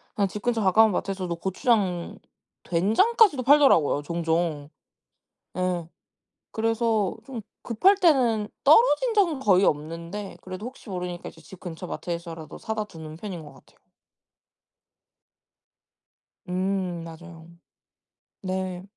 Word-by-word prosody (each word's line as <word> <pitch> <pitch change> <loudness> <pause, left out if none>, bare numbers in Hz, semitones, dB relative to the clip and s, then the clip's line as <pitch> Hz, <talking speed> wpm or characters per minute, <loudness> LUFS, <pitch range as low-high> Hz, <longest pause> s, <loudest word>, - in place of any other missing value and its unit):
그냥 200 -2 +2
집 205 +2 -7
근처 235 -1 0
가까운 215 +3 +5
마트에서도 185 -2 -2
고추장, 190 -2 0 0.5
된장까지도 255 - +3
팔더라고요 265 - +5
종종. 165 -2 -1 0.9
예. 180 -2 -1 0.6
그래서 225 -2 0
좀 245 -2 -7 0.2
급할 370 - +3
때는 250 - +3
떨어진 450 - +5
적은 340 -10 +2
거의 195 -5 +4
없는데 170 +7 -3
그래도 185 +4 -7
혹시 255 -2 -11
모르니까 180 -2 -5
이제 165 - -18
집 170 +4 -14
근처 175 0 -7
마트에서라도 170 -3 -6
사다 220 -1 -3
두는 160 -5 -10
편인 180 -2 -7
것 150 - -12
같아요. - - -22 2.7
음 185 -2 -2
맞아요. 165 0 -11 0.9
네. 185 -1 -3
190 Hz, 260 characters per minute, -25 LUFS, 170-225 Hz, 2.7 s, 가까운